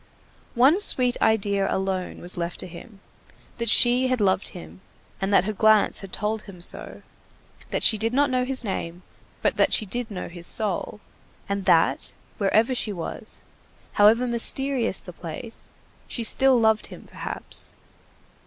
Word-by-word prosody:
One 270 Hz, +10 st, +4 dB
sweet 250 Hz, -11 st, +2 dB
idea 200 Hz, -3 st, +1 dB
alone 190 Hz, -1 st, -3 dB
was 175 Hz, -, 0 dB
left 170 Hz, 0 st, -5 dB
to -, -, -7 dB
him, 195 Hz, +4 st, -13 dB, 0.6 s
that 235 Hz, -1 st, 0 dB
she 245 Hz, +3 st, +6 dB
had 255 Hz, -1 st, -1 dB
loved 190 Hz, -2 st, +1 dB
him, 80 Hz, +3 st, -10 dB, 0.4 s
that 195 Hz, -1 st, +2 dB
her 215 Hz, +2 st, -3 dB
glance 215 Hz, 0 st, +3 dB
had 195 Hz, -2 st, -11 dB
told 215 Hz, +1 st, -3 dB
him 195 Hz, -4 st, -13 dB
so, 175 Hz, -, -4 dB, 0.7 s
that -, -, -2 dB
she 215 Hz, -, +5 dB
did 225 Hz, +2 st, -1 dB
not 280 Hz, +2 st, +1 dB
know 255 Hz, 0 st, +1 dB
his 260 Hz, 0 st, +1 dB
name, 180 Hz, -4 st, -5 dB, 0.4 s
but -, -, +1 dB
that -, -, +2 dB
she 215 Hz, -, +2 dB
did 240 Hz, +4 st, -5 dB
know 195 Hz, -4 st, -6 dB
his 175 Hz, -1 st, -4 dB
soul, 210 Hz, 0 st, +1 dB, 0.5 s
and 200 Hz, -1 st, -3 dB
that, 165 Hz, 0 st, +2 dB, 0.3 s
wherever 220 Hz, +5 st, +2 dB
she 230 Hz, -3 st, -2 dB
was, 175 Hz, -4 st, -5 dB, 0.5 s
however 220 Hz, +4 st, +4 dB
mysterious 245 Hz, -1 st, +2 dB
the 180 Hz, -, -11 dB
place, 175 Hz, +8 st, -9 dB, 0.4 s
she 235 Hz, -, -4 dB
still 260 Hz, +3 st, +3 dB
loved 220 Hz, -1 st, +2 dB
him -, -, -12 dB
perhaps. -, -, -3 dB
215 Hz, 155 wpm, -24 LUFS, 190-240 Hz, 0.7 s, she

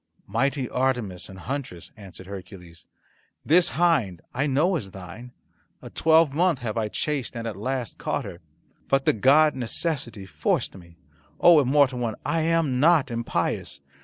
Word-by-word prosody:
"Mighty 135 Hz, +5 st, -1 dB
Artemis 120 Hz, -10 st, -2 dB
and 95 Hz, -, -11 dB
huntress," 125 Hz, -, -6 dB
answered 95 Hz, -2 st, -12 dB
Hercules, 90 Hz, -3 st, -11 dB, 0.6 s
"this 170 Hz, +3 st, +4 dB
hind 155 Hz, -, +2 dB
I 140 Hz, +4 st, 0 dB
know 155 Hz, +7 st, +2 dB
is 110 Hz, -12 st, -4 dB
thine. 95 Hz, +6 st, -10 dB, 0.5 s
A -, -, -11 dB
twelve 160 Hz, -2 st, +3 dB
month 170 Hz, 0 st, +2 dB
have 115 Hz, -4 st, -5 dB
I 110 Hz, -2 st, -1 dB
chased 135 Hz, +1 st, -3 dB
and 115 Hz, -, -5 dB
at 110 Hz, -3 st, -4 dB
last 125 Hz, 0 st, -4 dB
caught -, -, -2 dB
her. 85 Hz, -, -9 dB, 0.5 s
But 135 Hz, 0 st, +1 dB
the -, -, +4 dB
god 145 Hz, +7 st, +4 dB
Necessity 120 Hz, -, -3 dB
forced 95 Hz, -, -1 dB
me! 85 Hz, -2 st, -15 dB, 0.4 s
Oh, 170 Hz, -3 st, +7 dB
immortal 135 Hz, -1 st, +3 dB
one, 115 Hz, -3 st, -2 dB
I 165 Hz, -, 0 dB
am 160 Hz, -5 st, +1 dB
not 150 Hz, -3 st, +4 dB
impious. 115 Hz, -10 st, -2 dB
125 Hz, 155 wpm, -25 LUFS, 100-150 Hz, 0.6 s, Oh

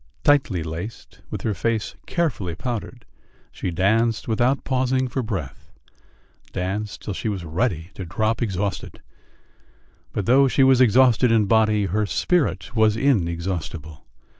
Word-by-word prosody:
Tightly 135 Hz, -, +3 dB
laced, 85 Hz, +8 st, -7 dB
with -, -, -5 dB
her 110 Hz, -, 0 dB
face 110 Hz, +3 st, -1 dB
carefully 125 Hz, -, -1 dB
powdered, 120 Hz, +3 st, -5 dB, 0.5 s
she -, -, -4 dB
danced 110 Hz, +6 st, +1 dB
without 120 Hz, +4 st, +1 dB
pausing 130 Hz, 0 st, 0 dB
for 130 Hz, +2 st, -2 dB
breath 90 Hz, -, -5 dB, 0.8 s
danced 95 Hz, +3 st, -4 dB
till 105 Hz, -, -4 dB
she 110 Hz, -, -3 dB
was 95 Hz, -4 st, -4 dB
ready 85 Hz, 0 st, -2 dB
to 95 Hz, -, -7 dB
drop 110 Hz, +7 st, -1 dB
exhausted. 100 Hz, -3 st, -3 dB, 1.1 s
But 100 Hz, -, -3 dB
though 135 Hz, +5 st, +5 dB
she 135 Hz, +1 st, +3 dB
was 130 Hz, -1 st, +5 dB
exhausted 125 Hz, 0 st, +5 dB
in 110 Hz, -2 st, +4 dB
body, 110 Hz, -1 st, +3 dB
her 105 Hz, +3 st, 0 dB
spirit 120 Hz, -, 0 dB
was 110 Hz, -1 st, +3 dB
inexhaustible.... 85 Hz, -, -2 dB
110 Hz, 135 wpm, -23 LUFS, 90-125 Hz, 1.1 s, though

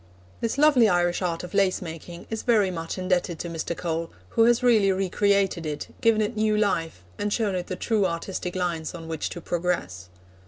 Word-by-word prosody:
This 230 Hz, +3 st, -2 dB
lovely 280 Hz, -7 st, +5 dB
Irish 175 Hz, 0 st, +1 dB
art 170 Hz, -2 st, -2 dB
of 180 Hz, -, -8 dB
lace 195 Hz, -2 st, +2 dB
making 170 Hz, 0 st, -8 dB
is 220 Hz, -, -2 dB
very 210 Hz, -6 st, +3 dB
much 165 Hz, 0 st, -5 dB
indebted 180 Hz, -2 st, 0 dB
to 170 Hz, -, -5 dB
Mr. 165 Hz, 0 st, -4 dB
Cole, 165 Hz, -1 st, -2 dB, 0.2 s
who 230 Hz, -, +4 dB
has 240 Hz, +1 st, +3 dB
really 220 Hz, -5 st, +5 dB
re 190 Hz, 0 st, -1 dB
created 200 Hz, -3 st, +2 dB
it, 150 Hz, -2 st, -5 dB
given 225 Hz, -3 st, +4 dB
it 215 Hz, +2 st, -3 dB
new 215 Hz, 0 st, +2 dB
life, 165 Hz, -, 0 dB, 0.2 s
and 205 Hz, 0 st, -1 dB
shown 210 Hz, -2 st, 0 dB
it 180 Hz, -1 st, -3 dB
the 185 Hz, -, -3 dB
true 205 Hz, +1 st, +1 dB
artistic 180 Hz, +1 st, -4 dB
lines 175 Hz, -3 st, -2 dB
on 165 Hz, -1 st, -8 dB
which 160 Hz, -2 st, -3 dB
to -, -, -7 dB
progress. 165 Hz, -, -2 dB
180 Hz, 200 wpm, -25 LUFS, 170-210 Hz, 0.2 s, lovely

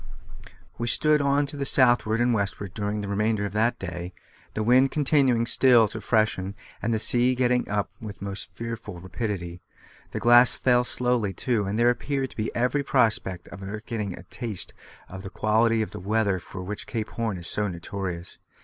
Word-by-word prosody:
We 120 Hz, -, -2 dB
stood 150 Hz, +4 st, +3 dB
on 140 Hz, +1 st, +2 dB
to 140 Hz, -, -5 dB
the 140 Hz, -, -2 dB
southward 120 Hz, -5 st, +5 dB
and 120 Hz, 0 st, +2 dB
westward 100 Hz, -2 st, -3 dB
during 105 Hz, +1 st, -3 dB
the 100 Hz, -, -5 dB
remainder 105 Hz, +1 st, 0 dB
of 100 Hz, -, -5 dB
that 115 Hz, +3 st, +1 dB
day, 90 Hz, -1 st, -6 dB, 0.4 s
the 110 Hz, -, -1 dB
wind 130 Hz, +4 st, +4 dB
continuing 135 Hz, -5 st, +2 dB
still 120 Hz, -1 st, +5 dB
to 110 Hz, -, -7 dB
freshen, 105 Hz, -3 st, 0 dB, 0.3 s
and 115 Hz, -, -1 dB
the 110 Hz, -, +1 dB
sea 125 Hz, +3 st, +4 dB
getting 125 Hz, 0 st, +1 dB
up 105 Hz, 0 st, -1 dB
with 105 Hz, -2 st, -8 dB
most 100 Hz, -1 st, -5 dB
fearful 115 Hz, -6 st, -6 dB
rapidity. 90 Hz, -2 st, -5 dB, 0.5 s
The -, -, -4 dB
glass 120 Hz, +1 st, +6 dB
fell 125 Hz, -1 st, +3 dB
slowly 125 Hz, -6 st, -1 dB
too, 110 Hz, +1 st, 0 dB
and 100 Hz, +2 st, -2 dB
there 120 Hz, +1 st, +4 dB
appeared 135 Hz, +1 st, -3 dB
to -, -, -15 dB
be 110 Hz, 0 st, -2 dB
every 125 Hz, +4 st, +1 dB
prospect 110 Hz, -9 st, 0 dB
of 100 Hz, -, -10 dB
our 100 Hz, +2 st, -6 dB
getting 105 Hz, -4 st, -5 dB
a 85 Hz, -, -11 dB
taste 110 Hz, 0 st, -4 dB, 0.3 s
of 95 Hz, 0 st, -9 dB
the 95 Hz, -, -7 dB
quality 110 Hz, +2 st, +2 dB
of -, -, -7 dB
the -, -, -7 dB
weather 100 Hz, 0 st, 0 dB
for 90 Hz, +1 st, -9 dB
which 105 Hz, +3 st, -6 dB
Cape 110 Hz, -2 st, -4 dB
Horn 115 Hz, -4 st, -3 dB
is 85 Hz, -, -9 dB
so 105 Hz, +4 st, -2 dB
notorious. 90 Hz, -1 st, -6 dB
110 Hz, 190 wpm, -25 LUFS, 100-120 Hz, 0.5 s, glass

